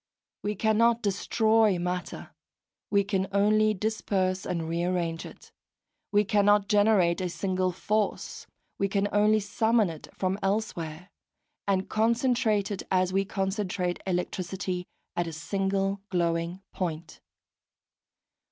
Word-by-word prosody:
We 210 +1 -2
cannot 225 +3 +3
destroy 215 0 +2
matter, 180 +1 -4 0.6
we 200 -1 +3
can 195 -1 -1
only 215 +2 +3
disperse 190 -3 -1
and 165 -2 -2
rearrange 170 0 -1
it; - - -15 0.6
we 205 0 +4
cannot 205 0 +3
generate 205 -4 +3
a 180 - -1
single 185 0 -1
force, 210 +4 -2 0.3
we 200 - +2
can 200 +1 0
only 210 +1 +4
summon 220 -1 +2
it 160 - -10
from 190 +1 -2
elsewhere, 185 -4 -2 0.6
and 190 -1 +1
concentrate 225 -2 +1
it, 200 - -3
as 185 -1 +2
we 195 +1 +2
concentrate 190 -2 -2
electricity, 180 0 -2 0.3
at 175 -1 0
a 165 - -5
single 195 +5 -1
glowing 170 +1 -1
point. 165 -3 -4
195 Hz, 115 wpm, -28 LUFS, 180-210 Hz, 0.6 s, we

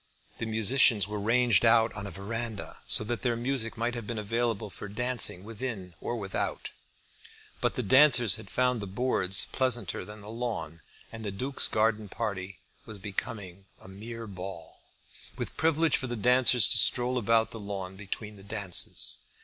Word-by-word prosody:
The 115 - -3
musicians 110 -1 +4
were 105 0 -4
ranged 120 0 +3
out 115 -1 +4
on 100 0 -6
a - - -6
verandah, 110 +4 -6
so - - +5
that 120 +2 -3
their 120 -3 0
music 120 -1 -2
might 120 +2 -1
have 120 -3 -6
been 115 - -4
available 110 0 -2
for 105 - -7
dancing 120 -3 -1
within 105 -4 -6
or 120 - -3
without; 100 -4 -4 0.9
but - - 0
the - - -2
dancers 125 -4 +5
had 110 -3 -12
found 125 -2 +1
the 100 - -5
boards 95 -3 +2
pleasanter 120 -9 0
than 105 +2 -11
the 105 +2 -9
lawn, 115 -9 -4 0.3
and 110 0 -8
the 105 - -2
Duke's 130 +8 -1
garden 110 -1 0
party 100 -5 -4 0.3
was 110 -2 -8
becoming 100 -1 -5
a - - -14
mere 115 +4 -8
ball, 95 -4 -9 0.6
with - - -5
privilege 160 0 +2
for 130 - -4
the 120 - -4
dancers 125 0 +5
to - - +7
stroll 125 +1 +4
about 115 0 +2
the 115 - -7
lawn 100 -2 -6
between 105 +2 -5
the 95 - -14
dances. 100 -3 -2
110 Hz, 170 wpm, -28 LUFS, 100-120 Hz, 0.9 s, to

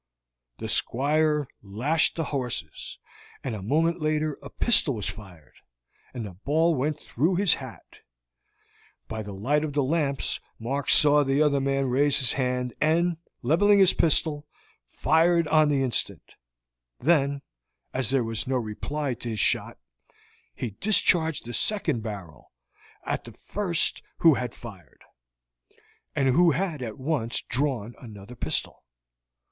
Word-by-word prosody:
The 110 - -6
Squire 150 +5 +1
lashed 125 +10 0
the 165 - -2
horses, 125 -4 -4 0.5
and 130 - -4
a 105 - -6
moment 160 - 0
later 155 -1 -1
a 140 - -10
pistol 160 - +4
was 105 - -4
fired, 90 -5 -11 0.6
and 120 -4 -6
the 100 - -8
ball 155 - +1
went 150 +2 -1
through 160 +9 -1
his 195 -1 +4
hat. - - -9 1.1
By 110 0 -5
the 105 -1 -8
light 145 +10 0
of 150 -2 -4
the 145 -1 +1
lamps 140 -1 -1 0.2
Mark 135 +5 -3
saw 150 -1 +6
the 135 +2 +2
other 140 -2 +1
man 135 0 0
raise 135 +3 +2
his 130 -5 +5
hand, 125 -2 -2
and, 165 +2 +1 0.3
leveling 200 +10 +4
his 190 -2 +6
pistol, 150 -2 +1 0.4
fired 170 - +2
on 155 -1 +4
the 140 -2 +1
instant; 125 -4 -1 0.7
then, 140 -2 +1 0.5
as 130 -3 0
there 135 -2 +1
was 115 0 -1
no 130 0 0
reply 130 +5 -4
to 120 0 -7
his 110 -2 -4
shot, - - +1 0.8
he 120 - -5
discharged 165 - +3
the 120 - -7
second 155 - 0
barrel 100 -8 -9 0.5
at - - -3
the - - -11
first 180 -6 -1 0.2
who 165 -2 +5
had 125 -3 -4
fired, 100 -7 -13 1.1
and 135 -1 +1
who 170 +7 +4
had 170 -5 -3
at 110 -4 -6
once 130 -4 -1
drawn 125 -4 -2
another 105 -1 -11
pistol. - - -2
140 Hz, 140 wpm, -25 LUFS, 120-155 Hz, 1.1 s, saw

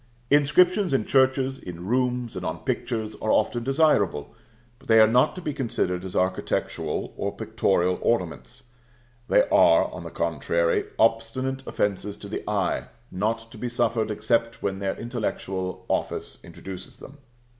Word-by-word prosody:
Inscriptions 175 +6 +4
in 110 -6 +1
churches, 130 0 +2
in 85 0 -8
rooms, 125 +1 0
and 90 - -5
on 80 -1 -4
pictures, 110 +3 -2
are 110 - -2
often 120 -1 +1
desirable, 135 - +2 0.5
but - - -19
they 110 -1 +6
are 110 - +9
not 120 +4 +3
to 185 - -7
be 150 - -2
considered 90 -9 -1
as 95 -1 -7
architectural 95 0 -1
or - - -3
pictorial 90 -1 +1
ornaments: 80 - -2 0.6
they - - +4
are, - - +5
on - - -8
the - - -7
contrary, - - 0
obstinate 130 +4 +1
offences 105 0 -1
to 100 - -9
the 100 - -5
eye, 100 -4 0 0.3
not 115 +4 -2
to - - -11
be 125 - -3
suffered 115 -2 0
except 115 +2 0
when 95 -1 -1
their 95 -1 -2
intellectual 95 -6 -4
office - - -3
introduces 95 -1 -10
them. 145 +2 -13
115 Hz, 150 wpm, -25 LUFS, 95-130 Hz, 0.6 s, are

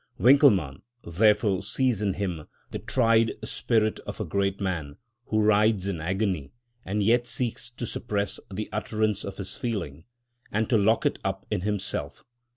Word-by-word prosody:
Winckelmann 115 - +5 0.2
therefore 105 +2 +2
sees 125 -6 0
in 100 -2 +1
him 90 -6 -3 0.2
"the - - -4
tried 115 -2 +2
spirit 110 0 0
of - - -8
a 110 - -2
great 100 +3 -1
man, 85 -7 -3 0.3
who 110 - +1
writhes 105 -2 +3
in 95 -5 -3
agony, 95 -3 -1 0.3
and 105 +2 -1
yet 120 +3 +3
seeks 125 0 -1
to 120 0 -6
suppress 100 -2 -2
the 105 +3 -4
utterance 105 -1 -1
of 100 - -6
his 95 -2 -5
feeling, 100 - -4 0.5
and 110 +1 0
to 115 - +5
lock 110 +3 +2
it - - +1
up 95 0 -3
in - - 0
himself. 100 0 -3
105 Hz, 160 wpm, -26 LUFS, 95-110 Hz, 0.5 s, Winckelmann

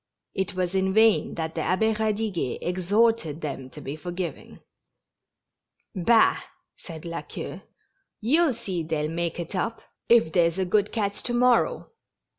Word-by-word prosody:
It 190 -1 -2
was 180 -1 -1
in 190 0 +1
vain 220 -1 +4
that 160 -1 -3
the - - -2
Abbd 220 +4 +1
Eadiguet 215 - -1
exhorted 185 -2 +1
them 135 -3 -5
to 150 - -11
be 140 0 -6
forgiving. 175 +2 -6 1.3
"Bah!" 220 +4 +4 0.4
said 165 -3 -10
La 170 0 -4
Queue, - - -7 0.6
"you'll 285 +4 +3
see 185 -6 -4
they'll 155 -1 -2
make 170 0 -2
it 170 +2 -5
up, 225 +5 -2 0.3
if 225 -9 +5
there's 170 -2 +3
a 190 - 0
good 205 +3 +1
catch 205 -3 -1
to 240 - -2
morrow. 245 -1 +2
185 Hz, 145 wpm, -26 LUFS, 165-220 Hz, 1.3 s, if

